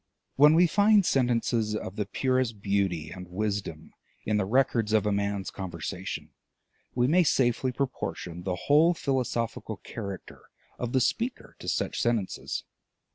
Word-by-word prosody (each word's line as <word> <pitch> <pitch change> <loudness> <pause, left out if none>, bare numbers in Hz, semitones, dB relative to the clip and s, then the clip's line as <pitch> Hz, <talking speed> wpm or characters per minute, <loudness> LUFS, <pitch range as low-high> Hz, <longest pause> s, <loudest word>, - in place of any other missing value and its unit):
When 150 +3 +7
we 175 +2 +6
find 205 +3 +4
sentences 120 -5 +1
of 100 -2 -5
the 105 -2 -2
purest 130 -1 0
beauty 95 -6 -1
and 90 +1 -8
wisdom 95 -4 -4 0.3
in 105 0 +1
the 105 - +1
records 115 -2 +2
of 110 -2 +3
a 105 - +2
man's 100 -1 -1
conversation, 95 0 -5 0.6
we 120 0 +3
may 165 +8 +4
safely 130 -3 +2
proportion 120 -9 -4
the 90 0 -2
whole 160 +4 +5
philosophical 120 -6 -2
character 100 +1 -8 0.4
of 125 -1 -3
the 130 - +3
speaker 235 - -2
to - - -9
such - - -1
sentences. 115 -5 -1
110 Hz, 140 wpm, -28 LUFS, 100-130 Hz, 0.6 s, When